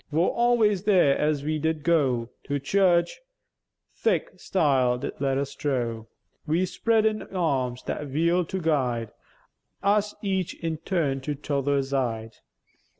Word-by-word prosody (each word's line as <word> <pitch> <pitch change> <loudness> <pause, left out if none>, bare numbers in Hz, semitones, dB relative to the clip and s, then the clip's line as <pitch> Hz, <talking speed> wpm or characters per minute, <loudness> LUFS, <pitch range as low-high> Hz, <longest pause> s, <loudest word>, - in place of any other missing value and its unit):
Vor 165 +4 +2
always 230 -5 +2
there, 180 -9 +4
as 150 -2 0
we 155 +1 -1
did 160 0 -1
goo 135 -8 +2 0.2
To 145 0 -1
church, 175 - +2 0.8
thik - - -1
stile 135 -8 +2
did - - -4
let 135 -1 +1
us 140 0 -2
drough, 120 -6 -2 0.4
Wi' 165 +4 +2
spreadèn 220 +2 0
eärms 135 -9 -1
that 150 - -4
wheel'd 170 +4 +1
to 190 - -2
guide 125 - 0 0.7
Us 205 +1 +2
each 190 -3 -1
in 165 -1 -3
turn 155 -5 -1
to 145 +2 -3
tother 140 -1 0
zide. 120 -5 -2
150 Hz, 135 wpm, -26 LUFS, 135-180 Hz, 0.8 s, there